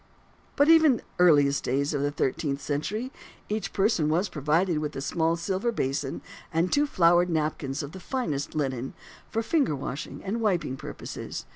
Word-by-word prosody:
But 285 +1 +4
even 320 -3 +7
in - - -1
the - - -13 0.2
earliest 145 -5 +5
days 140 +4 0
of 145 - 0
the 145 - +1
thirteenth 140 0 -1
century, 200 - -3 0.4
each 215 +1 -2
person 195 -6 +2
was 175 +6 +1
provided 155 +3 +1
with 150 -1 -4
a - - -3
small 160 +4 0
silver 190 +7 -1
basin 135 - -2 0.3
and 165 +3 +1
two 290 +1 +3
flowered 175 -5 +4
napkins 155 -3 -1
of 145 - -7
the 190 - -9
finest 170 - -3
linen, 135 -4 -2 0.3
for 225 - -1
finger 265 - +1
washing 135 +1 -6
and 215 +4 -2
wiping 180 - 0
purposes. - - -7
165 Hz, 170 wpm, -27 LUFS, 145-205 Hz, 0.4 s, even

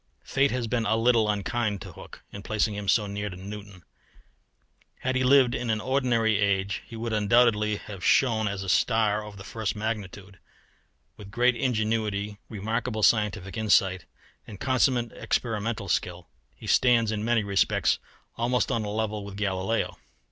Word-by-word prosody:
Fate 140 +1 +2
has 125 -2 -2
been 115 -1 -1
a 110 - +2
little 115 -1 +3
unkind 105 0 -1
to - - -9
Hooke - - -13
in 100 - -8
placing 110 0 0
him 100 -1 -6
so 105 +2 +3
near 105 +1 -4
to 90 - -8
Newton; 100 -1 -9 1.2
had 130 0 -1
he 130 - +1
lived 130 -1 +5
in 125 -2 -3
an 110 -1 +1
ordinary 120 -4 +1
age 100 -1 0
he 115 - -10
would 115 0 -4
undoubtedly 105 0 +3
have 100 -3 -9
shone 115 -6 +3
as 100 -1 -3
a - - -7
star 110 +1 +2
of 105 -1 -10
the 95 - -9
first 110 0 -3
magnitude. 100 -3 -5 0.8
With 100 -2 -11
great 125 +4 +2
ingenuity, 110 -4 -1
remarkable 110 +1 -3
scientific 105 -3 +2
insight, 95 -5 +2 0.4
and 100 -3 -10
consummate 125 -2 +1
experimental 110 -2 -2
skill, 90 0 -2 0.3
he - - -13
stands 120 -3 +3
in 105 -1 -2
many 115 -1 +2
respects 100 -2 +1 0.4
almost 120 +2 0
on 115 - 0
a 105 - -4
level 105 0 -2
with 100 -1 -8
Galileo. 100 +2 -1
110 Hz, 160 wpm, -26 LUFS, 100-115 Hz, 1.2 s, lived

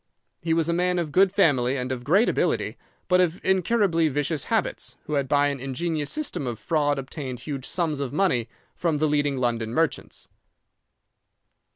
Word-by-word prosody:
He 165 -1 +1
was 165 -1 +1
a 170 - +1
man 180 +1 +1
of 165 -4 -2
good 190 +5 +4
family 140 -9 +2
and 125 0 -3
of 125 -2 -4
great 190 - +4
ability, - - 0 0.3
but 180 0 +4
of 175 -1 0
incurably 190 -3 +2
vicious 145 +1 -1
habits, - - -1
who 150 - -5
had 140 -2 +1
by 145 +1 +3
an 140 -1 -4
ingenious 145 +3 -2
system 300 - -3
of 120 -2 -3
fraud 145 +5 0
obtained 135 -2 -6
huge 140 -2 -5
sums 160 -5 -1
of 140 -3 -3
money 140 -9 +1 0.2
from 165 -3 0
the 155 +1 +2
leading 145 -2 +1
London 120 -3 -1
merchants. 165 -3 -1
150 Hz, 175 wpm, -25 LUFS, 135-170 Hz, 0.3 s, good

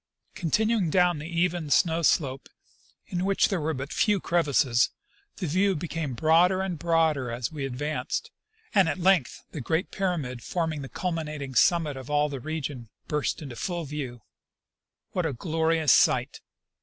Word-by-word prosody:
Continuing 210 +2 +1
down 175 -1 +3
the 150 - -6
even 170 -2 -1
snow 165 +3 +3
slope, 135 -4 +1 0.6
in 180 0 -3
which 195 0 +2
there 190 -5 -1
were 155 +1 -1
but 135 +3 -5
few 210 -2 +2
crevasses, 140 -9 +2 0.5
the 185 - -4
view 190 +5 +2
became 155 -4 -4
broader 170 +7 +4
and 180 -5 -3
broader 160 -6 +1
as 120 0 -3
we 145 -3 -3
ad 125 - -6
vanced, 150 +4 -3 0.4
and 195 -6 +4
at - - -2
length 185 -6 +2
the 150 - -5
great 160 +8 -1
pyramid 155 - -2
forming 160 -2 -2
the 135 - -7
culminating 155 -6 -4
summit 160 +1 +3
of 130 0 -9
all 150 0 +2
the 140 -2 -5
region 140 -5 -5 0.2
burst 150 +2 -1
into 135 -5 -8
full 175 +4 -3
view. 135 -6 -6 0.9
What 180 -3 0
a 145 - -3
glorious 160 +2 +2
sight! - - +2
160 Hz, 160 wpm, -27 LUFS, 140-175 Hz, 0.9 s, broader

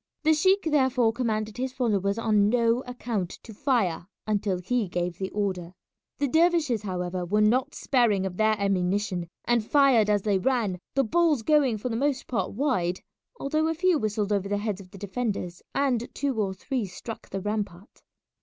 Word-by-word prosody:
The 315 0 +5
sheik 380 +6 +3
therefore 260 -7 +2
commanded 220 -3 -2
his 260 0 -2
followers 200 -5 0
on 210 -3 +3
no 235 0 +3
account 235 -7 -3
to 225 - -10
fire 205 - 0 0.2
until 205 -3 0
he 215 +4 -1
gave 175 0 -3
the 190 -1 -2
order. 185 -4 -3 0.4
The 285 - +1
dervishes, 320 - +2
however, 180 -2 -3
were 205 +5 +1
not 250 +7 +2
sparing 225 -7 +2
of 185 -2 -4
their 215 +2 +3
ammunition, 190 -2 0 0.2
and 240 -2 +2
fired 255 -4 +4
as 205 -2 +2
they 205 -3 +2
ran, 225 -6 0 0.2
the 275 - +4
balls 310 -1 +2
going 280 -5 +3
for 230 +4 -4
the 225 - -2
most 270 +2 0
part 195 -7 -2
wide, 200 -8 0 0.4
although 310 +3 0
a 325 - 0
few 350 -1 +2
whistled 210 -1 -1
over 200 -1 -1
the 205 - 0
heads 205 -1 -3
of 185 - -15
the 195 - -12
defenders 200 -3 -3
and 255 -4 +1
two 270 -6 -1
or 190 -2 -2
three 250 +3 -2
struck 200 +5 -8
the 195 - -3
rampart. 205 -1 -4
215 Hz, 180 wpm, -26 LUFS, 195-260 Hz, 0.4 s, The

